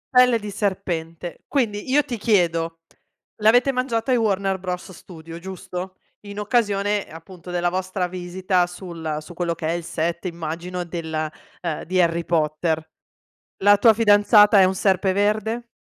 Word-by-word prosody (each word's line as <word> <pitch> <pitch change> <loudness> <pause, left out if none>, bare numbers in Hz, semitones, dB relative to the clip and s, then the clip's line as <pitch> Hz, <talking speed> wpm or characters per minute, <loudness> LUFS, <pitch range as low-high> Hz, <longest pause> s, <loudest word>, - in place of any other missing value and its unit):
Pelle 250 -1 +6
di 210 -2 -7
serpente. 175 -4 -3
Quindi 235 -4 -1
io 290 +2 +4
ti 240 - -5
chiedo: 165 -6 +1 0.6
l'avete 245 +5 +5
mangiato 255 -1 -1
ai 250 - +4
Warner 195 -3 0
Bros 180 0 -5
Studio, 165 -2 -11
giusto? 185 0 -7 0.3
In 200 0 -7
occasione, 205 -2 0
appunto, 170 +2 -12
della 175 0 0
vostra 185 0 -2
visita 180 0 -1
sul 170 -4 -6
su 155 - -12
quello 170 -1 -2
che 160 - -6
è - - +1
il 170 0 -3
set, 170 +2 -3
immagino, 170 +2 -5
della 160 -2 -4 0.3
ehm, 165 -4 -3
di 185 +2 0
Harry 170 -1 +2
Potter. 160 0 0 0.8
La 205 +1 +6
tua 225 +1 +6
fidanzata 210 -1 +6
è 190 - +7
un 185 +1 +2
Serpeverde? 205 +5 +1
185 Hz, 150 wpm, -22 LUFS, 170-205 Hz, 0.8 s, è